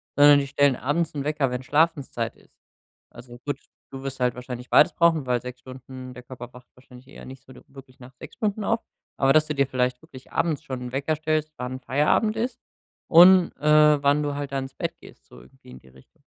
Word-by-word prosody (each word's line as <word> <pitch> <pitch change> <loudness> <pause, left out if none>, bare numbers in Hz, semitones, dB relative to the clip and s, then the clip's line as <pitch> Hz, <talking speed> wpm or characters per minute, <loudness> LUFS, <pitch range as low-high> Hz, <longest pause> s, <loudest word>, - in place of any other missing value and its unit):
sondern 145 0 +7
die 140 - -3
stellen 140 -1 +2
abends 155 +5 -1
'n 145 -2 -4
Wecker, 150 -3 0
wenn 125 +1 -4
Schlafenszeit 145 -6 0
ist. - - -26 0.6
Also 120 0 -13
gut, 145 - -3 0.3
du 135 0 -8
wirst 135 -1 -6
halt 125 -1 0
wahrscheinlich 125 0 -8
beides - - +5
brauchen, 165 -4 +2
weil 125 -1 0
6 125 0 -9
Stunden 130 0 -11
der 125 0 -12
Körper 125 0 -10
braucht 125 0 -16
wahrscheinlich 125 0 -17
eher 140 - -13
nicht 130 0 -12
so - - -17
de - - -16
wirklich 135 -2 -16
nach 130 +1 -14
6 125 - -13
Stunden 215 -1 -2
auf. 225 +3 0 0.4
Aber, 135 0 +3
dass 155 0 +3
du 150 - -3
dir 140 -1 +1
vielleicht 125 -1 -1
wirklich 130 -1 -15
abends 160 -4 -1
schon 130 -2 -6
'n 125 - -7
Wecker 145 +3 -1
stellst, 155 0 -1
wann 125 +1 -5
Feierabend 150 - +1
ist 245 +2 -3 0.5
und, 180 +1 +7
äh, 150 0 +4
wann 145 +1 +3
du 145 -1 -3
halt 145 -1 -5
da 135 - 0
ins 135 0 -7
Bett - - -4
gehst, - - -17
so - - -16
irgendwie 65 +1 -20
in 65 - -12
die 65 - -23
Richtung. 65 0 -23
135 Hz, 225 wpm, -24 LUFS, 125-150 Hz, 0.6 s, sondern